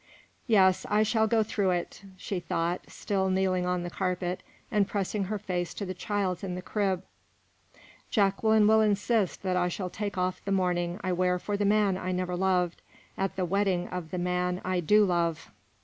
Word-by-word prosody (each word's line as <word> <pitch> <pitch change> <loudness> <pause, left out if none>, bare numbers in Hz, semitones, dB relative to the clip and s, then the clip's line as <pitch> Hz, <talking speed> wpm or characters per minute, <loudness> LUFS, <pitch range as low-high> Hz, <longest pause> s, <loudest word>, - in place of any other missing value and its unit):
"Yes, 190 -5 +4
I 210 +1 +4
shall 220 0 +2
go 220 0 +3
through 205 -2 0
it," 175 0 -2 0.2
she 195 0 -3
thought, 170 +1 -1
still 190 -2 -1
kneeling 185 -1 +1
on 180 -1 0
the 175 - -4
carpet, 180 -1 -2 0.3
and 205 -2 +2
pressing 200 0 -1
her 210 +3 -2
face 180 -3 -3
to 200 - -4
the 185 - -4
child's 190 -1 -2
in 180 -2 -3
the 180 - -5
crib; 195 -4 -1 1.1
"Jacqueline 210 +1 +3
will 220 +1 +5
insist 210 -1 +1
that 185 -1 0
I 180 0 +2
shall 180 0 -4
take 205 -2 -4
off 185 0 -1
the 200 - -3
mourning 180 -1 0
I 185 - 0
wear 180 0 +2
for 205 +3 -3
the 205 0 0
man 200 -2 +3
I 185 - -3
never 180 0 -2
loved, 180 -1 +1 0.3
at 195 0 -2
the 185 - 0
wedding 185 -1 0
of 180 -3 -5
the 180 - -4
man 180 0 0
I 185 -1 0
do 210 +5 +4
love. 170 -3 -1
185 Hz, 190 wpm, -28 LUFS, 180-205 Hz, 1.1 s, will